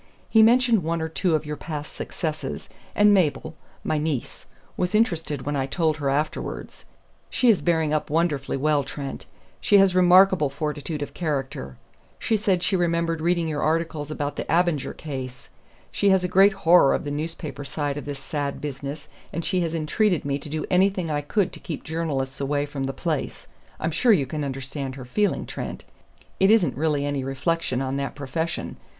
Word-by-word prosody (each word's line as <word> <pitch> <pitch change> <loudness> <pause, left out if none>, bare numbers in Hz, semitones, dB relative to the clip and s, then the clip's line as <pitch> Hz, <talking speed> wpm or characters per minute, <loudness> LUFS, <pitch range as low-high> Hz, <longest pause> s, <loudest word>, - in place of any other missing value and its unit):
He 220 - +6
mentioned 235 -1 +5
one 165 +1 -1
or 160 - -2
two 165 +1 +1
of 155 - -1
your 150 0 -4
past 150 -1 -6
successes, 155 -2 -4 0.3
and 205 0 +6
Mabel 160 -3 +1 0.3
my 155 - 0
niece 150 -5 -3 0.3
was 180 +3 -1
interested 165 - +1
when 145 +1 -2
I 135 -1 0
told 155 +1 0
her 140 -3 -1
afterwards. 150 +3 -3 0.4
She 245 -2 +4
is 205 - +1
bearing 160 -3 +1
up 155 - -1
wonderfully 150 -4 0
well, 145 +1 +2
Trent; 140 +1 -7 0.3
she 205 - +4
has 195 -2 +5
remarkable 185 -3 +5
fortitude 150 +1 -3
of - - -8
character. 135 - -3 0.4
She 225 - 0
said 195 -4 +1
she 190 - +1
remembered 170 -2 0
reading 170 0 +1
your 150 -2 -2
articles 160 -2 -1
about 145 -1 -3
the - - -3
Abinger 170 -4 +1
case. 130 -4 -7 0.4
She 200 - +2
has 190 -1 +4
a - - +1
great 195 +2 +5
horror 175 -6 +5
of - - -3
the 145 - -4
newspaper 155 0 -5
side 145 0 -3
of 145 - -6
this 145 -1 -5
sad 140 0 -3
business, 145 +1 -6 0.2
and 165 +1 -4
she 185 -2 +1
had 165 -1 -1
entreated 165 +3 +1
me 140 0 -1
to 145 - -9
do 155 +1 -3
anything 185 -2 +2
I 145 -1 0
could 185 +6 0
to - - -10
keep 155 - -6
journalists 140 -5 -3
away 145 +1 0
from 140 -2 -4
the 135 - -1
place 155 0 -3 0.3
I'm 160 - -1
sure 230 +10 +3
you 160 -10 +4
can 150 +3 -4
understand 135 0 -4
her 130 -2 -8
feeling, 205 +11 0
Trent; - - -6 0.6
it 195 - +5
isn't 215 -6 +4
really 145 0 0
any 145 -2 -1
reflection 135 0 -1
on 135 +1 -2
that 140 0 -3
profession. 145 +4 -4
155 Hz, 185 wpm, -24 LUFS, 145-175 Hz, 0.6 s, He